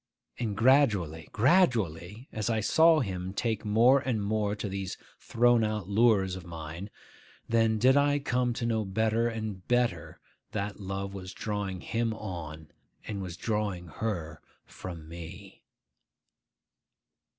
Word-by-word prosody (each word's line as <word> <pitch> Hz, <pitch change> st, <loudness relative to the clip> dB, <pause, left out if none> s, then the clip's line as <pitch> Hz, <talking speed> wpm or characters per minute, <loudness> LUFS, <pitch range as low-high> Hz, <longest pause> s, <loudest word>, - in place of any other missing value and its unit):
And 110 Hz, -5 st, -2 dB
gradually, 105 Hz, -, +3 dB
gradually, 115 Hz, -, +2 dB
as 110 Hz, 0 st, -2 dB
I 110 Hz, -1 st, +1 dB
saw 160 Hz, +8 st, +5 dB
him 95 Hz, -4 st, -4 dB
take 110 Hz, -2 st, -1 dB
more 115 Hz, +6 st, +5 dB
and 130 Hz, -5 st, -1 dB
more 105 Hz, 0 st, 0 dB
to 105 Hz, -, -4 dB
these 95 Hz, -1 st, -4 dB, 0.2 s
thrown 120 Hz, 0 st, +3 dB
out 105 Hz, -3 st, -2 dB
lures 100 Hz, -3 st, +3 dB
of 95 Hz, -, -8 dB
mine, 85 Hz, +3 st, -7 dB, 0.6 s
then 115 Hz, -1 st, +2 dB
did 130 Hz, +5 st, +5 dB
I 145 Hz, 0 st, +4 dB
come 125 Hz, -3 st, 0 dB
to 115 Hz, -, -3 dB
know 110 Hz, -2 st, +1 dB
better 110 Hz, +4 st, +1 dB
and 110 Hz, -5 st, -5 dB
better 120 Hz, -1 st, 0 dB, 0.3 s
that 105 Hz, 0 st, -3 dB
love 100 Hz, 0 st, -4 dB
was 95 Hz, -1 st, -7 dB
drawing 100 Hz, -4 st, -3 dB
him 115 Hz, -1 st, -1 dB
on, 80 Hz, -7 st, -7 dB, 0.3 s
and 100 Hz, -2 st, -4 dB
was 90 Hz, -2 st, -6 dB
drawing 100 Hz, -6 st, -2 dB
her 85 Hz, -8 st, -4 dB, 0.2 s
from 85 Hz, -4 st, -9 dB
me. 85 Hz, 0 st, -10 dB
105 Hz, 135 wpm, -29 LUFS, 95-115 Hz, 0.6 s, saw